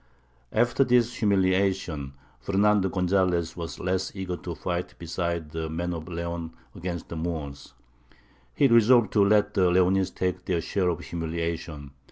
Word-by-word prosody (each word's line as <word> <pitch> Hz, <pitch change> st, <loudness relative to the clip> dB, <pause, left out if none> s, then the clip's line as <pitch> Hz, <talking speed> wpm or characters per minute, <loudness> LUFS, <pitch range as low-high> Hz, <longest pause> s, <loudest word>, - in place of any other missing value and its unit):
After 120 Hz, +3 st, +3 dB
this 120 Hz, -2 st, +3 dB
humiliation, 95 Hz, -, +1 dB, 0.3 s
Fernando 100 Hz, +5 st, +2 dB
Gonzalez 90 Hz, -2 st, +1 dB
was 85 Hz, -2 st, -6 dB
less 95 Hz, +1 st, -1 dB
eager 95 Hz, -2 st, -3 dB
to 85 Hz, -1 st, -6 dB
fight 90 Hz, +1 st, -4 dB
beside 85 Hz, -2 st, -3 dB
the 80 Hz, 0 st, -4 dB
men 85 Hz, +2 st, -2 dB
of 80 Hz, -1 st, -6 dB
Leon 85 Hz, -1 st, -5 dB, 0.2 s
against 90 Hz, -3 st, -5 dB
the -, -, -5 dB
Moors; 80 Hz, -4 st, -5 dB, 0.8 s
he 140 Hz, -, +5 dB
resolved 115 Hz, 0 st, +5 dB
to 105 Hz, -, +5 dB
let 105 Hz, +1 st, +3 dB
the 90 Hz, -2 st, +3 dB
Leonese 95 Hz, +1 st, +3 dB
take 90 Hz, 0 st, -3 dB
their 90 Hz, -2 st, 0 dB
share 90 Hz, +2 st, 0 dB
of 85 Hz, -, -2 dB
humiliation. 80 Hz, -3 st, -4 dB
90 Hz, 145 wpm, -26 LUFS, 85-95 Hz, 0.8 s, he